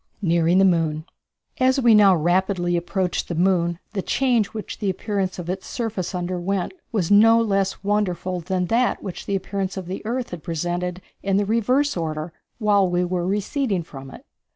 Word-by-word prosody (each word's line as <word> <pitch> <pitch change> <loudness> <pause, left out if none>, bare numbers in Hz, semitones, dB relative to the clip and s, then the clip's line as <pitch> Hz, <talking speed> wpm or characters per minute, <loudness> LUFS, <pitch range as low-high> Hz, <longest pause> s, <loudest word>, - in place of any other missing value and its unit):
Nearing 170 0 +3
the 195 - +6
Moon. 160 -4 +1 0.5
As 260 +1 +3
we 240 -3 +5
now 200 -3 +7
rapidly 175 +1 +1
approached 180 +1 -1
the 170 - -3
moon 170 -1 +2 0.2
the 200 - -1
change 240 -2 +1
which 215 0 -7
the 205 -3 -1
appearance 190 -1 -2
of 175 -2 -6
its 190 +2 -4
surface 210 -7 -3
underwent 180 - -2 0.2
was 200 -5 -1
no 225 +3 +7
less 195 -4 0
wonderful 185 -3 -1
than 180 +1 -1
that 235 +6 +1
which 190 -4 -7
the 200 - +1
surface 195 0 -4
of 190 - -4
the 185 +3 -6
earth 240 +3 -3
had 175 -3 -6
presented 175 +2 -3 0.2
in 195 0 +1
the 205 - +1
reverse 250 +7 +1
order 160 -1 -3 0.2
while 205 -4 +3
we 180 0 +1
were 175 0 -2
receding 205 - -1
from 135 -4 -10
it. - - -13
190 Hz, 175 wpm, -23 LUFS, 175-210 Hz, 0.5 s, now